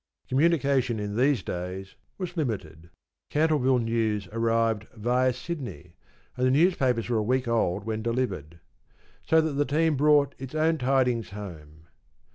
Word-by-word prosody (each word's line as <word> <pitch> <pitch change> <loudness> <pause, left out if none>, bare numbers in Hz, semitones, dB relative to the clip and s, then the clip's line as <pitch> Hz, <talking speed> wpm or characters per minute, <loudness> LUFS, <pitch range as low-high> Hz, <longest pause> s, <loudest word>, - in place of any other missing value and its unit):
Communication 135 -5 +2
in 105 0 -4
these 130 +2 +2
days 90 +2 -5 0.2
was 180 -2 -5
limited. 90 - -4 0.4
Cantleville 150 -4 +2
news 115 -4 -1
arrived 115 -1 0
via 125 +4 +2
Sydney, 125 - -7 0.4
and 125 0 +1
the - - +3
newspapers 135 - +2
were 120 -2 +1
a - - +1
week 125 +3 0
old 110 -6 0
when 110 0 -3
delivered. 100 - -3 0.7
So 160 - +5
that 160 -1 -1
the 145 +1 +1
team 160 -1 +3
brought 145 0 +4
its 135 +2 -7
own 160 +1 +2
tidings 125 -3 +1
home. 80 -6 -10
120 Hz, 140 wpm, -27 LUFS, 105-140 Hz, 0.7 s, So